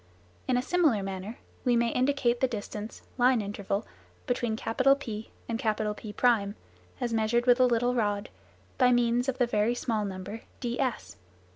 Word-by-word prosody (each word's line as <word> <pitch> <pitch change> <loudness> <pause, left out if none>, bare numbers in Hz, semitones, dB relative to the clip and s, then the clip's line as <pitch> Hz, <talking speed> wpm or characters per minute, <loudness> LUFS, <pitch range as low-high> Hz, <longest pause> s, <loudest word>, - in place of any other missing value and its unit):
In 255 - +2
a 250 - 0
similar 300 - +2
manner 195 +4 -5 0.3
we 245 -2 +3
may 235 0 +2
indicate 250 -1 +1
the 260 - +3
distance 215 -2 -6 0.2
(line 250 0 +5
interval) 200 0 -3 0.4
between 245 -4 -1
P - - -10 0.8
and 230 -1 -2
P1, 215 0 0 0.5
as 240 -1 -1
measured 225 +2 +2
with 245 0 +5
a 255 - +6
little 245 +1 +2
rod, 205 -4 0 0.5
by 250 -1 +5
means 240 +1 +2
of 260 - -2
the 250 - +3
very 230 0 +1
small 225 -3 -1
number 200 +2 -6 0.2
ds. 245 - -2
235 Hz, 150 wpm, -28 LUFS, 210-245 Hz, 0.8 s, a